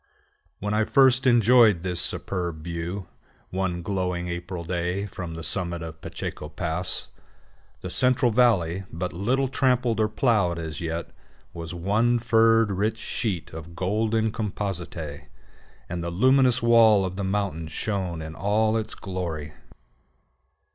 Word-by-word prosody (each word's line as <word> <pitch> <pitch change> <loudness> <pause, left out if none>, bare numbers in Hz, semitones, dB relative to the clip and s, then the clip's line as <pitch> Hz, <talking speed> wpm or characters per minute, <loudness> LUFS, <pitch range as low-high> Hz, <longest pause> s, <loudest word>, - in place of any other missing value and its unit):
When 105 +1 -3
I 110 +1 +3
first 130 -1 +4
enjoyed 115 -6 +5
this 90 -2 -1
superb 85 -5 -2
view, 85 +3 -4 0.5
one 90 -2 -2
glowing 90 -2 -2
April 85 0 -5
day, 90 +3 -2
from 90 -4 -7
the 80 - -7
summit 85 -1 0
of 80 -1 -6
the 80 - -30
Pacheco 75 - -6
Pass, 85 +3 -3 0.7
the - - -6
Central 125 -1 +3
Valley, 100 -7 +2
but 85 +3 -4
little 125 +10 0
trampled 125 -4 +1
or 110 -1 +2
plowed 105 -7 +1
as 80 -3 -5
yet, 85 0 -4 0.4
was 85 +1 -6
one 110 +7 +2
furred, 115 -2 +4
rich 105 +4 0
sheet 100 -6 -3
of 80 +1 -9
golden 110 +4 0
compositae, 90 -8 -4 0.6
and 85 -1 -4
the 85 - -2
luminous 130 +6 +3
wall 115 -4 +6
of 95 0 -4
the 100 - -3
mountains 95 -5 -2
shone 90 -3 -3
in 80 0 -7
all 110 +5 +1
its 110 - -4
glory. 85 -6 -5
95 Hz, 140 wpm, -25 LUFS, 85-110 Hz, 0.7 s, wall